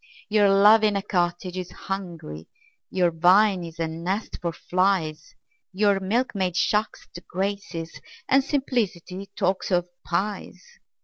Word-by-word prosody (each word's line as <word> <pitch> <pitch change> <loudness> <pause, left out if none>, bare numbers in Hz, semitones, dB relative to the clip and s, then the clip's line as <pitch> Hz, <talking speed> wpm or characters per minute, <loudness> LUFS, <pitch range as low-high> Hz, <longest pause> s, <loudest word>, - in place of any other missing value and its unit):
Your 210 -1 +4
love 205 +3 +6
in 210 -1 +3
a 200 - -1
cottage 175 -2 -1
is 185 -1 -5
hungry, 170 - -7 0.4
Your 180 -2 +2
vine 185 +3 +4
is 165 -1 -9
a 165 - 0
nest 175 +6 -4
for 170 - -1
flies 180 -3 -1 0.4
Your 200 0 +3
milkmaid 195 -3 -1
shocks 210 +3 0
the 175 - -9
Graces, 185 -3 -4 0.3
And 270 +1 +4
simplicity 205 - -2
talks 190 +1 0
of 175 -2 +1 0.2
pies! 200 +3 -3
190 Hz, 130 wpm, -25 LUFS, 175-205 Hz, 0.4 s, love